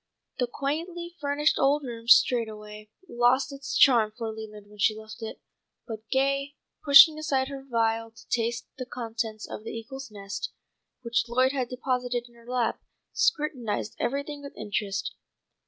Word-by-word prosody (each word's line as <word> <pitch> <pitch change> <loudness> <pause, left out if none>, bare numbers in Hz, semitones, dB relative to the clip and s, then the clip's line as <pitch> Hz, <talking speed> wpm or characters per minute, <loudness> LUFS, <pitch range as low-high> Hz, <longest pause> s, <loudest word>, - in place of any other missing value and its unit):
The 245 - +2
quaintly 335 +7 -4
furnished 290 +1 +1
old 285 +2 +3
room 230 -3 -7
straightway 215 -3 +3 0.2
lost 250 +3 +2
its 275 0 -4
charm 235 -6 +6
for 225 -2 -3
Leland 215 -1 -9
when 210 0 -17
she 215 - +3
left 220 +1 -10
it, 220 - -6 0.5
but 220 -2 -8
Gay, 275 +1 +1 0.3
pushing 305 +2 +9
aside 270 -3 0
her 275 -1 -6
veil 225 -3 0
to 225 - -18
taste 230 0 -1
the 255 - -4
contents 225 -3 -4
of 210 - -7
the - - -6
eagle's 265 +4 -7
nest, 200 -1 -6 0.5
which 235 -1 +1
Lloyd 255 +2 +3
had 260 -4 -2
deposited 250 -1 -2
in 240 - -21
her 235 0 -19
lap, 245 -2 0 0.3
scrutinized 250 -9 0
everything 280 +3 -2
with 280 -1 -10
interest. 205 -1 -2
245 Hz, 155 wpm, -27 LUFS, 225-275 Hz, 0.5 s, pushing